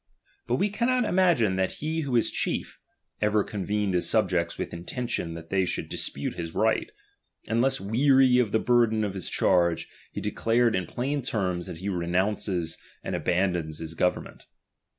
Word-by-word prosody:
But 120 - +1
we 200 +10 +1
cannot 245 +3 +1
imagine 170 - +3
"that 95 0 0
he 160 +2 -2
who 135 -5 -2
is 115 - +2
chief, - - -3 0.4
ever 105 0 +3
convened 105 0 -2
his 90 - +1
subjects 90 -6 +1
"^vith - - -5
intention 85 -1 -3
that 80 0 -10
they 95 -1 +3
should 90 - -3
dispute - - -3
his 85 -2 -6
right; - - +1 0.6
^□nless 120 +4 +2
weary 125 +5 +4
of 115 -5 +1
the 110 - +3
burthen 115 -2 +3
of 100 -2 -2
his 95 -2 -3
charge, 85 -2 +2 0.2
he - - -5
de - - -2
<::lared 115 0 +2
in 95 -1 -1
plain 140 +4 -2
terms 90 -7 -2
that - - -7
he 95 +4 -6
renounces 90 -1 -1 0.2
and - - -3
abandons 90 -4 0
his 80 0 -5
government. 90 +2 -2
105 Hz, 170 wpm, -27 LUFS, 90-125 Hz, 0.6 s, weary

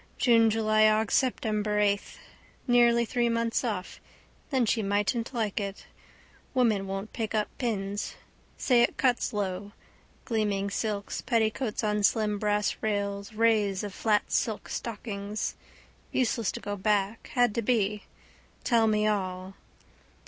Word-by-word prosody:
Junejulyaugseptember 215 -1 +3
eighth. 205 -1 0 0.5
Nearly 235 -1 +4
three 240 +1 0
months 230 +1 0
off. 205 -6 -4 0.5
Then 260 -4 +2
she 225 +1 +1
mightn't 205 +4 0
like 220 -5 -1
it. 200 -1 -5 0.7
Women 220 -6 +2
won't 195 +2 -5
pick 220 -2 -3
up 210 -1 0
pins. 205 -4 -2 0.4
Say 245 -3 +3
it 240 - +1
cuts 250 -2 +1
lo. 200 -1 -3 0.5
Gleaming 205 -3 -1
silks, 205 -1 -3
petticoats 225 -1 0
on 210 -1 +1
slim 210 0 +2
brass 210 0 0
rails, 200 -1 -2
rays 210 -3 +2
of 205 -2 -5
flat 210 0 +1
silk 220 -3 -1
stockings. 210 -2 -4 0.6
Useless 230 -4 0
to - - -5
go 205 - -4
back. 205 +1 0
Had 245 -3 +3
to 235 - -1
be. 210 -3 0 0.6
Tell 230 -3 +3
me 215 -1 +2
all. 190 -3 -2
215 Hz, 125 wpm, -28 LUFS, 205-230 Hz, 0.7 s, Nearly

